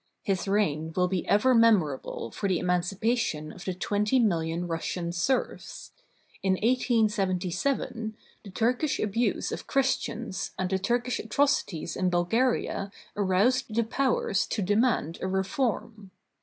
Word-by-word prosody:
His 195 -1 -1
reign 160 -6 0
will 180 0 +3
be 180 -2 -2
ever 235 +6 +4
memorable 185 - +2
for 200 - -2
the 185 - +2
emancipation 180 -1 0
of 185 - -11
the 185 - -2
twenty 210 +6 +1
million 170 -6 +1
Russian 170 +1 -3
serfs. 180 +10 -2 0.5
In 190 -1 +2
1877, 220 0 0 0.3
the 205 - -10
Turkish 245 +8 0
abuse 220 +3 0
of - - -6
Christians 255 -6 -1
and 185 0 -2
the 190 - +1
Turkish 240 +4 0
atrocities 220 - 0
in 185 -1 +1
Bulgaria 200 +3 0 0.2
aroused 210 +5 +1
the 230 - +3
Powers 235 -4 0
to 210 - -2
de 205 +3 +1
mand 220 - +1
a - - -1
reform. 210 +2 -2
200 Hz, 130 wpm, -27 LUFS, 180-235 Hz, 0.5 s, ever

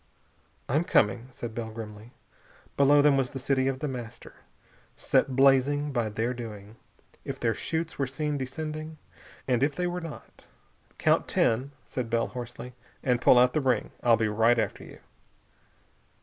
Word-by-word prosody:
"I'm 150 +6 +1
coming," 115 -5 +2
said 120 -3 -7
Bell 115 -1 -4
grimly. 110 0 -9 0.6
Below 145 +1 +5
them 145 -2 +5
was 130 -2 0
the 135 - -7
city 130 0 +1
of 135 -1 -2
The 150 - -1
Master, 120 -4 -8 0.6
set 130 - +1
blazing 140 +2 +3
by 120 -4 -1
their 115 +4 -1
doing. 110 -3 -9 0.5
If - - -6
their 115 -2 +1
chutes 160 +9 -3
were 135 - +1
seen 150 +3 -2
descending.... 155 +3 -5 0.5
And 125 -2 +1
if 145 +1 +1
they 180 - -1
were 180 0 -2
not.... 165 -2 -10 0.5
"Count - - +2
ten," 130 +5 +1
said 125 -3 -4
Bell 115 0 0
hoarsely, 125 0 -8 0.3
"and 125 -2 +1
pull 125 - +6
out 125 +1 +5
the 155 - +1
ring. 125 -5 0
I'll 115 -2 +4
be 110 - +1
right 115 +3 +3
after - - -2
you." - - -13
130 Hz, 165 wpm, -27 LUFS, 115-145 Hz, 0.6 s, pull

